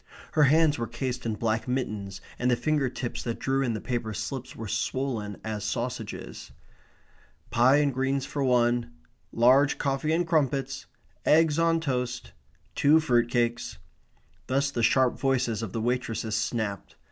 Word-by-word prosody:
Her 150 -1 +4
hands 155 0 +4
were 115 - -2
cased 125 +1 -4
in 110 - -1
black 115 +1 -1
mittens, 105 -7 -3 0.2
and 125 - +1
the 125 - +4
finger 145 0 0
tips 120 -1 -5
that 115 -1 -3
drew 135 +1 0
in 125 -4 0
the - - -3
paper 115 -3 -3
slips 120 +5 -5
were 115 - -6
swollen 110 -1 -2
as 110 -2 -4
sausages. 115 -1 -5 1.0
"Pie 125 +4 +5
and 145 -2 +2
greens 135 +1 0
for 140 0 -3
one. 120 -5 +2 0.4
Large 130 +5 +4
coffee 140 +2 -1
and 170 +2 +2
crumpets. 135 -4 0 0.4
Eggs 160 0 +4
on 165 0 +3
toast. 125 -4 -3 0.4
Two 150 +3 +5
fruit 120 -7 +2
cakes." 120 0 -1 0.7
Thus 140 +2 +1
the 120 - -2
sharp 130 +2 +3
voices 130 -5 0
of 110 -4 -4
the 115 - -3
waitresses 115 -2 -1
snapped. 105 -2 -3
125 Hz, 155 wpm, -27 LUFS, 115-140 Hz, 1.0 s, Pie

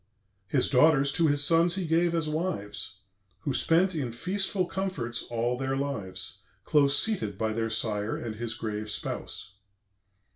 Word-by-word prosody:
His 130 +4 +2
daughters 140 +1 +4
to 170 -2 +3
his 145 -1 +3
sons 165 +3 +5
he 190 -2 -1
gave 170 +1 +2
as 165 -2 0
wives; 150 - -3 0.4
Who 140 -4 -2
spent 175 +7 +3
in 140 -7 -2
feastful 185 - 0
comforts 160 -14 -2
all 120 +1 -1
their 135 0 -1
lives, 100 -9 -4 0.2
Close 145 +2 +4
seated 110 - -1
by 110 +1 -1
their 115 0 -1
sire 110 -1 -1
and 110 -2 -5
his 115 0 -3
grave 105 -2 -4
spouse. 95 -2 -5
135 Hz, 150 wpm, -28 LUFS, 110-165 Hz, 0.4 s, sons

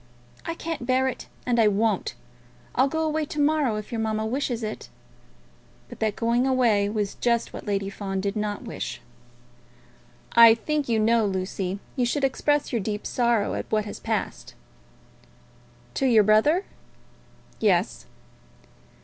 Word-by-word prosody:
I 330 - -2
can't 325 -8 -5
bear 260 +1 +2
it, 260 - -5 0.2
and 240 -1 +1
I 220 - +5
won't. 210 +2 0 0.6
I'll 260 - +3
go 320 +3 -1
away 310 0 0
to 295 - -6
morrow, 290 -5 +2
if 215 0 -6
your 230 -2 -2
mamma 220 0 -1
wishes 245 -1 -2
it." 215 0 -5 1.0
But - - -11
that 215 -2 0
going 235 +2 +1
away 230 -6 +3
was 210 -2 -2
just 235 -1 0
what - - -8
Lady 200 -1 -1
Fawn 195 -1 -4
did 200 +2 -2
not 210 -1 -3
wish. - - -5 1.3
"I 230 -1 +8
think 295 +4 -2
you 230 - +2
know, 225 0 +3
Lucy, 190 0 -3 0.2
you 250 -3 +1
should 280 +4 -1
express 290 +2 +1
your 230 - +1
deep 210 +1 -4
sorrow 235 -4 +1
at - - -5
what 215 -1 +1
has 205 - -7
passed." - - -4 1.4
"To 270 - +1
your 225 -4 +6
brother?" 220 - +3 0.9
"Yes." 195 -2 +1
230 Hz, 150 wpm, -25 LUFS, 210-260 Hz, 1.4 s, I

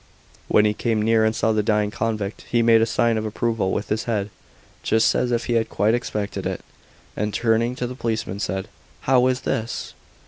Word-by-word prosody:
When 105 - +4
he 105 - +2
came 110 0 -1
near 110 0 +3
and 110 0 +1
saw 110 - +1
the 110 -1 +2
dying 105 -1 +1
convict, 105 -2 -3
he 120 -1 +2
made 115 -1 +5
a 115 - +3
sign 115 -1 +1
of - - -4
approval 110 -3 -1
with 105 - -3
his 110 +3 -1
head, 105 -4 -1 0.5
just 110 0 +3
as 125 - 0
if 120 -1 0
he 120 - -1
had 115 -1 +1
quite 105 +2 +1
expected 105 -4 -2
it, - - -4 0.5
and, 105 +1 -1
turning 115 +2 +1
to 125 - -3
the 125 - -5
policeman, 110 -5 -3
said, 95 -1 -3 0.3
"How 130 -1 +3
is 130 0 0
this?" 115 -3 -3
110 Hz, 205 wpm, -23 LUFS, 105-115 Hz, 0.5 s, made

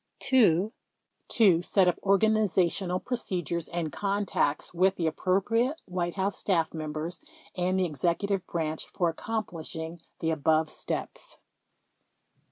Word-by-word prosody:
2. 215 -6 +4 0.5
To 190 -8 +5
set 185 +1 +3
up 180 - +1
organizational 195 -3 +2
procedures 175 - -3
and 170 -3 -3
contacts 195 -4 -1
with 190 +2 +3
the 170 - -2
appropriate 210 - +1
White 175 -1 -2
House 195 0 -1
Staff 165 -5 +1
members 155 +2 -4 0.3
and 185 0 +1
the 185 -1 +2
Execu 170 +6 0
tive 195 -3 -1
Branch 160 -2 -2
for 175 -3 0
accomplishing 165 -4 -5 0.2
the 160 - 0
above 155 0 +2
steps. - - -4
180 Hz, 120 wpm, -28 LUFS, 165-200 Hz, 0.5 s, To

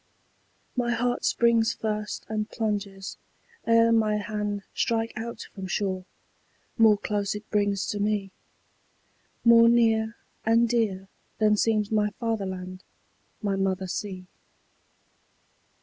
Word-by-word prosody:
My 245 -2 0
heart 245 +1 -1
springs 235 -1 +3
first 210 -1 -3
and 215 0 -2
plunges, 200 -4 -3 0.5
ere 230 0 +5
my 220 -2 +3
hand 210 -1 -3
Strike 230 0 0
out 235 0 -5
from 190 -2 -6
shore: 185 -1 -2 0.7
more 220 -3 +6
close 205 0 -2
it 210 +1 -8
brings 205 -2 +1
to 205 - -2
me, 205 -2 0 1.1
More 230 0 +8
near 225 -1 +3 0.3
and 230 +1 +4
dear 215 -5 0 0.3
than 215 -1 +4
seems 215 -1 +1
my 210 -1 +2
fatherland, 190 -5 -3 0.6
My 200 -1 +1
mother 190 -1 0
sea. 185 0 -5
210 Hz, 115 wpm, -26 LUFS, 200-225 Hz, 1.1 s, More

